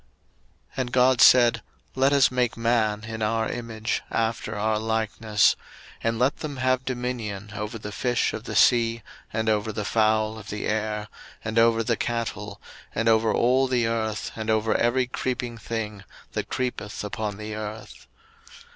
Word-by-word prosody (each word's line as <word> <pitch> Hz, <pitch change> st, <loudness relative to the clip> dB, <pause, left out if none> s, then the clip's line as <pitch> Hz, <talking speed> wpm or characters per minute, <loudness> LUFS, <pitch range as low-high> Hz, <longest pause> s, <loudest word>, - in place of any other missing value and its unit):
01:001:026 -, -, -22 dB
And 130 Hz, -2 st, -2 dB
God 125 Hz, -1 st, +4 dB
said, 120 Hz, -2 st, +7 dB, 0.3 s
Let 135 Hz, +1 st, +3 dB
us 140 Hz, -2 st, +5 dB
make 125 Hz, -2 st, 0 dB
man 115 Hz, -2 st, +1 dB
in 110 Hz, 0 st, -6 dB
our 110 Hz, +1 st, +1 dB
image, 115 Hz, -2 st, -3 dB
after 115 Hz, -1 st, -1 dB
our 110 Hz, +1 st, +1 dB
likeness: 110 Hz, -2 st, +2 dB, 0.5 s
and 115 Hz, 0 st, 0 dB
let 125 Hz, +4 st, +2 dB
them 145 Hz, -3 st, -5 dB
have 130 Hz, 0 st, +1 dB
dominion 120 Hz, -5 st, -4 dB
over 105 Hz, +2 st, -4 dB
the 105 Hz, -1 st, -7 dB
fish 120 Hz, +2 st, 0 dB
of 110 Hz, -, -6 dB
the -, -, -5 dB
sea, 115 Hz, -2 st, +4 dB, 0.3 s
and 110 Hz, 0 st, -2 dB
over 110 Hz, 0 st, +1 dB
the 105 Hz, -1 st, -4 dB
fowl 110 Hz, 0 st, +2 dB
of 105 Hz, -, -11 dB
the 105 Hz, -, -4 dB
air, 105 Hz, 0 st, -1 dB, 0.4 s
and 110 Hz, +1 st, +1 dB
over 115 Hz, 0 st, +4 dB
the 115 Hz, 0 st, 0 dB
cattle, 115 Hz, -4 st, -3 dB, 0.4 s
and 115 Hz, -, 0 dB
over 110 Hz, -1 st, +4 dB
all 130 Hz, +4 st, +3 dB
the 125 Hz, -2 st, +1 dB
earth, 110 Hz, -2 st, -2 dB
and 110 Hz, 0 st, -4 dB
over 110 Hz, 0 st, +2 dB
every 125 Hz, +2 st, +2 dB
creeping 125 Hz, -1 st, -3 dB
thing 105 Hz, -3 st, -4 dB, 0.3 s
that -, -, -4 dB
creepeth 120 Hz, -6 st, -3 dB
upon 105 Hz, -1 st, -4 dB
the 105 Hz, 0 st, -6 dB
earth. 110 Hz, +1 st, -7 dB
115 Hz, 165 wpm, -25 LUFS, 110-120 Hz, 0.5 s, said